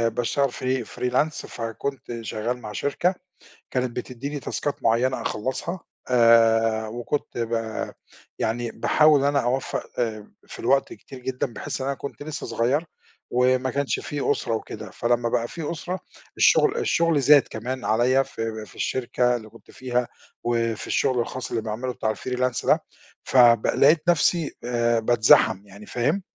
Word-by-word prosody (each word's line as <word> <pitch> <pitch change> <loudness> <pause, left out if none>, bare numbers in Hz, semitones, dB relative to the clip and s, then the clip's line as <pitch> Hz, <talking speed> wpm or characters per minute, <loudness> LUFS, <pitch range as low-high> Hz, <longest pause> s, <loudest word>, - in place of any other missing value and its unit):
باشتغل 135 +3 +1
free 130 -2 -1
freelance، 130 +5 0
فكنت 120 +1 -5
شغّال 115 +3 -3
مع 105 - -7
شركة 155 - 0 0.6
كانت 125 -2 -2
بتديني 135 +4 -5
تاسكات 145 +1 -3
معيّنة 125 +3 +2
أخلّصها، 130 - -3 0.3
آآ، 115 -2 +4
وكنت 120 +4 -4
ب 115 0 -2 0.9
يعني 115 +1 -1
باحاول 150 -2 +4
إن 140 - +2
أنا 140 0 +2
أوفَّق 130 +2 -1
آآ، 110 -3 -3
في - - -10
الوقت 135 0 +2
كتير 135 - -11
جدًا، 125 0 -3
بحيث 115 - -5
إن 130 - -2
أنا 140 - 0
كنت 140 +2 -7
لسّه 150 0 -5
صغيّر 125 +7 0 0.5
وما 130 +1 +2
كانش 140 +2 -1
فيه 145 -1 -2
أسرة 115 - -2
وكده، 110 - -6
فلمّا 120 0 0
بقى 120 0 0
في 160 +1 -5
أسرة، 180 +3 -4 0.4
الشغل 440 0 +4
الشغل 165 - +2
زاد 145 +1 +7
كمان 125 +4 -5
عليّا 125 +4 +3
في 115 -4 -5
في - - -17
الشركة 125 -1 0
اللي 110 -2 -9
كنت 115 +1 -18
فيها، 125 -1 -2 0.4
وفي 115 -2 -1
الشغل 130 -3 +1
الخاص 130 +2 -4
اللي 115 - -1
باعمله 115 +4 -3
بتاع 110 -2 -1
الfreelance 125 +1 -2
ده، - - +3 0.4
فب 120 -3 +5
لقيت 155 +3 +4
نَفْسي 170 -1 +2
آآ، 120 -1 +1
باتزحم، 110 -3 +4
يعني 100 +1 -13
فاهم؟ 145 +11 0
125 Hz, 150 wpm, -24 LUFS, 115-140 Hz, 0.9 s, زاد